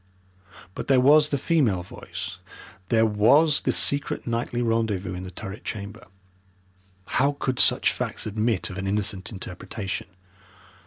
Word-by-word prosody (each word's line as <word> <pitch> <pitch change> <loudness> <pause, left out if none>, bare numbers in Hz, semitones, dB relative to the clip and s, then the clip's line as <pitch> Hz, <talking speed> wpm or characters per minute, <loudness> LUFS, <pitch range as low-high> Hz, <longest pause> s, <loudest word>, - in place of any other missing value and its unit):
But - - -6
there 135 -2 +5
was 150 +3 +6
the 140 - 0
female 130 - +1
voice, 90 - -7 0.5
there 115 -1 +4
was 140 +9 +4
the - - +1
secret 140 0 0
nightly 120 +1 -2
rendezvous 110 -5 0
in 90 - -5
the 95 - -7
turret 95 +3 -8
chamber 105 0 -7 1.0
how 140 +6 +1
could 130 -1 -1
such - - +4
facts - - -3
admit 110 -1 -1
of 95 - -6
an 95 - -3
innocent 100 -1 -1
interpretation. 95 0 -6
110 Hz, 140 wpm, -25 LUFS, 95-130 Hz, 1.0 s, was